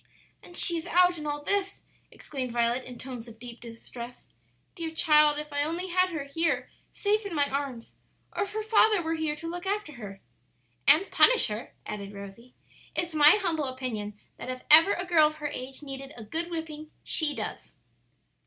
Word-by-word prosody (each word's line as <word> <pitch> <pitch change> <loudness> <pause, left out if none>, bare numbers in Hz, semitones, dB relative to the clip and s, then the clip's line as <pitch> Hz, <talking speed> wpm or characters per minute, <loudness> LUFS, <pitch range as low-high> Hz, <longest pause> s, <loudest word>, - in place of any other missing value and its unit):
"And 350 - -11
she 340 - +3
is 330 - -9
out 360 -1 +4
in 300 - -5
all 290 0 -3
this!" 395 +3 -1 0.3
exclaimed 260 -4 -6
Violet 240 +2 +1
in 250 -1 -9
tones 250 -2 -7
of 230 -1 -12
deep 235 0 -10
distress. 235 +1 -10 0.5
"Dear 330 -1 -4
child, 300 -2 +4
if 300 0 -6
I 285 - +1
only 340 +5 -3
had 365 +1 +3
her 315 -5 -4
here 280 -3 -1 0.2
safe 425 +1 0
in 400 -5 -5
my 285 -1 +3
arms, 270 -4 -4 0.4
or - - -1
if 405 0 -2
her 435 0 -2
father 430 -3 +4
were 325 0 -1
here 315 -2 -1
to 330 +2 -7
look 350 +2 -5
after 400 -6 -2
her!" 195 -2 -8 0.7
"And 310 +8 +5
punish - - +5
her," 215 +3 -6
added 205 -1 -6
Rosie. 200 +5 -11 0.4
"It's 345 -2 -1
my 300 0 +8
humble 335 -8 0
opinion 230 -6 -4 0.2
that - - -7
if 255 0 -5
ever 325 +6 +9
a 360 - -3
girl 330 -4 +5
of 305 - -5
her 300 -1 -4
age 265 +2 -7
needed 275 0 -7
a 225 - -8
good 325 +11 -4
whipping, 315 -2 -6
she 305 -3 0
does." - - -6
300 Hz, 190 wpm, -28 LUFS, 255-340 Hz, 0.7 s, ever